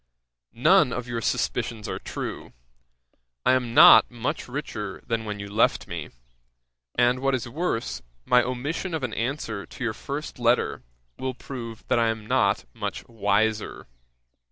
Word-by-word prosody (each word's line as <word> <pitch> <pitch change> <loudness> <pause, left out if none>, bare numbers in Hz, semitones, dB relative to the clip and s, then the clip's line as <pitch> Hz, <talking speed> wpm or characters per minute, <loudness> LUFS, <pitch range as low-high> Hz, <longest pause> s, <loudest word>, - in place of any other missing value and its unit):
None 125 - +5
of 125 +1 -4
your 120 -1 -3
suspicions 110 0 -1
are - - -4
true; - - -6 0.9
I - - +5
am 125 -2 0
not - - +9
much 125 +6 -3
richer 125 -7 -5
than 115 -1 -2
when 105 -1 -4
you 100 - -6
left 105 +3 +2
me; - - -5 0.9
and, 125 +1 +3
what 135 0 +1
is 120 -2 -4
worse, 120 - -2 0.2
my 125 - +5
omission 145 +8 -3
of 155 - -4
an 120 -4 -2
answer 115 -4 -3
to - - -8
your 115 -3 0
first 140 +4 -6
letter, 120 +1 +2 0.4
will 130 -1 -3
prove 115 -4 -8
that - - +2
I 115 - +3
am 110 -1 -2
not - - +2
much - - -5
wiser. 110 -1 0
120 Hz, 155 wpm, -25 LUFS, 110-130 Hz, 0.9 s, not